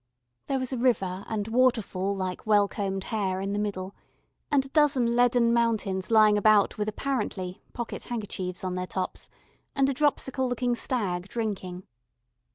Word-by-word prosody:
There 275 Hz, -, 0 dB
was 255 Hz, 0 st, -3 dB
a 255 Hz, -, -2 dB
river 195 Hz, -7 st, +1 dB
and 215 Hz, -2 st, -2 dB
waterfall 225 Hz, -6 st, +1 dB
like 185 Hz, -1 st, -4 dB
well 205 Hz, -1 st, +5 dB
combed 195 Hz, -2 st, -3 dB
hair 195 Hz, -4 st, -1 dB
in 195 Hz, +1 st, -2 dB
the 205 Hz, -, -1 dB
middle, 195 Hz, -2 st, -3 dB, 0.6 s
and 280 Hz, -2 st, +2 dB
a -, -, -11 dB
dozen 275 Hz, -6 st, +3 dB
leaden 245 Hz, -1 st, +4 dB
mountains 220 Hz, -5 st, 0 dB
lying 215 Hz, -2 st, +5 dB
about 215 Hz, 0 st, +4 dB
with 210 Hz, -, 0 dB
apparently 210 Hz, -7 st, -3 dB
pocket 235 Hz, -1 st, -5 dB
handkerchiefs 190 Hz, -6 st, -4 dB
on 185 Hz, -1 st, -2 dB
their 180 Hz, 0 st, -3 dB
tops, 185 Hz, 0 st, -4 dB, 0.5 s
and 275 Hz, -1 st, +3 dB
a -, -, +1 dB
dropsical 265 Hz, -2 st, +1 dB
looking 245 Hz, 0 st, 0 dB
stag 200 Hz, -7 st, -2 dB
drinking. 190 Hz, -5 st, -4 dB
215 Hz, 160 wpm, -27 LUFS, 190-245 Hz, 0.6 s, well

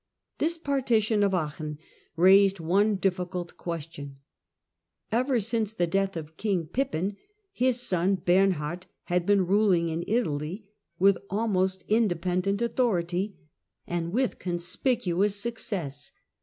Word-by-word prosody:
This 335 Hz, +2 st, +1 dB
partition 240 Hz, -8 st, +1 dB
of 200 Hz, -2 st, +3 dB
Aachen 155 Hz, -2 st, -3 dB, 0.4 s
raised 190 Hz, +2 st, +5 dB
one 200 Hz, +6 st, +2 dB
difficult 180 Hz, -2 st, -2 dB
question. 150 Hz, -4 st, -6 dB, 0.9 s
Ever 250 Hz, +2 st, +2 dB
since 220 Hz, 0 st, -1 dB
the 175 Hz, -5 st, +1 dB
death 195 Hz, +1 st, 0 dB
of 155 Hz, 0 st, -8 dB
King 195 Hz, -6 st, 0 dB
Pippin 200 Hz, -, -2 dB, 0.3 s
his 255 Hz, -9 st, +1 dB
son 190 Hz, -4 st, +1 dB
Bernhard 180 Hz, -2 st, +1 dB, 0.2 s
had 175 Hz, 0 st, -1 dB
been 200 Hz, -2 st, +4 dB
ruling 185 Hz, -3 st, +3 dB
in 165 Hz, +1 st, -2 dB
Italy 190 Hz, -3 st, -1 dB, 0.3 s
with 195 Hz, +1 st, +4 dB
almost 190 Hz, -3 st, 0 dB
independent 195 Hz, -1 st, +1 dB
authority 200 Hz, -5 st, 0 dB, 0.5 s
and 170 Hz, -1 st, -3 dB
with 250 Hz, +5 st, 0 dB
conspicuous 185 Hz, +2 st, 0 dB
success. 200 Hz, -, -4 dB
190 Hz, 115 wpm, -27 LUFS, 175-215 Hz, 0.9 s, raised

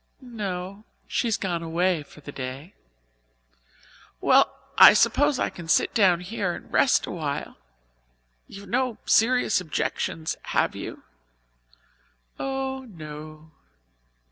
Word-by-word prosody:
"No. 200 Hz, -4 st, -5 dB, 0.2 s
She 240 Hz, -, -1 dB
has 225 Hz, -, +1 dB
gone 175 Hz, -4 st, -2 dB
away 170 Hz, +1 st, 0 dB
for 150 Hz, +1 st, -15 dB
the 145 Hz, -, -9 dB
day." 135 Hz, +6 st, -7 dB, 1.5 s
"Well, -, -, +4 dB, 0.2 s
I -, -, +10 dB
suppose 260 Hz, +6 st, +3 dB
I -, -, -1 dB
can 170 Hz, -2 st, -10 dB
sit 155 Hz, -, +2 dB
down 185 Hz, -6 st, +4 dB
here 180 Hz, -1 st, -3 dB
and -, -, -13 dB
rest 265 Hz, -, +3 dB
a -, -, -7 dB
while. 150 Hz, -, -4 dB, 0.9 s
You've 200 Hz, +1 st, -11 dB
no 255 Hz, -1 st, -1 dB
serious 230 Hz, -3 st, +3 dB
objections, 160 Hz, -1 st, -3 dB, 0.2 s
have -, -, +2 dB
you?" -, -, -7 dB, 1.4 s
"Oh, 265 Hz, 0 st, -3 dB
no." 155 Hz, -2 st, -10 dB
185 Hz, 115 wpm, -25 LUFS, 160-230 Hz, 1.5 s, I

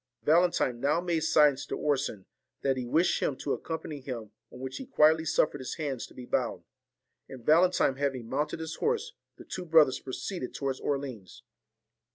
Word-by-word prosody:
Valentine 155 Hz, -5 st, +3 dB
now 140 Hz, +5 st, +2 dB
made 175 Hz, -2 st, 0 dB
signs 150 Hz, -3 st, +4 dB
to -, -, -4 dB
Orson 135 Hz, -9 st, -1 dB, 0.4 s
that 135 Hz, -1 st, +2 dB
he 125 Hz, -2 st, -4 dB
wished 165 Hz, +8 st, +2 dB
him 135 Hz, -, 0 dB
to 140 Hz, -, -2 dB
accompany 160 Hz, -2 st, -5 dB
him, 120 Hz, -5 st, -6 dB, 0.2 s
on -, -, -11 dB
which 130 Hz, 0 st, -5 dB
he 265 Hz, -, -8 dB
quietly 160 Hz, +1 st, +4 dB
suffered 150 Hz, -1 st, +1 dB
his 130 Hz, -, -5 dB
hands 140 Hz, -6 st, -3 dB
to -, -, -19 dB
be 125 Hz, -, -8 dB
bound; -, -, -1 dB, 0.7 s
and 125 Hz, -3 st, -10 dB
Valentine 170 Hz, -4 st, +4 dB
having 135 Hz, -4 st, -2 dB
mounted 145 Hz, +6 st, -2 dB
his 160 Hz, 0 st, -5 dB
horse, 465 Hz, +1 st, -1 dB, 0.2 s
the -, -, -12 dB
two 185 Hz, -, -5 dB
brothers 160 Hz, -5 st, +5 dB
pro 130 Hz, -, -8 dB
ceeded 175 Hz, -7 st, -5 dB
towards 135 Hz, -2 st, -2 dB
Orleans. 135 Hz, -9 st, -4 dB
145 Hz, 180 wpm, -29 LUFS, 130-160 Hz, 0.7 s, brothers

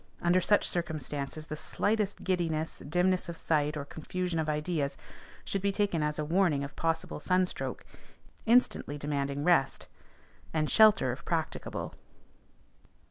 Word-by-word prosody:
Under 175 Hz, +2 st, +3 dB
such 205 Hz, +3 st, +3 dB
circumstances 155 Hz, -3 st, -3 dB
the 155 Hz, -, -5 dB
slightest 205 Hz, +5 st, -1 dB
giddiness, 165 Hz, -4 st, -1 dB
dimness 180 Hz, +3 st, +1 dB
of 170 Hz, -, -6 dB
sight, 150 Hz, -2 st, +1 dB
or 140 Hz, -, -4 dB
confusion 175 Hz, +3 st, -3 dB
of 155 Hz, -1 st, -1 dB
ideas, 150 Hz, -1 st, -1 dB, 0.5 s
should 195 Hz, -, -2 dB
be 200 Hz, 0 st, +1 dB
taken 195 Hz, -5 st, 0 dB
as 150 Hz, 0 st, 0 dB
a 150 Hz, -, -1 dB
warning 165 Hz, -3 st, +2 dB
of 140 Hz, 0 st, -7 dB
possible 165 Hz, -2 st, -1 dB
sunstroke, 185 Hz, +3 st, -1 dB, 0.6 s
instantly 230 Hz, -, +3 dB
demanding 140 Hz, -1 st, -2 dB
rest, 165 Hz, -6 st, +2 dB, 0.7 s
and 155 Hz, -1 st, +1 dB
shelter 210 Hz, -, +6 dB
if 130 Hz, +7 st, -7 dB
practicable. 160 Hz, -2 st, -3 dB
160 Hz, 135 wpm, -30 LUFS, 150-185 Hz, 0.7 s, shelter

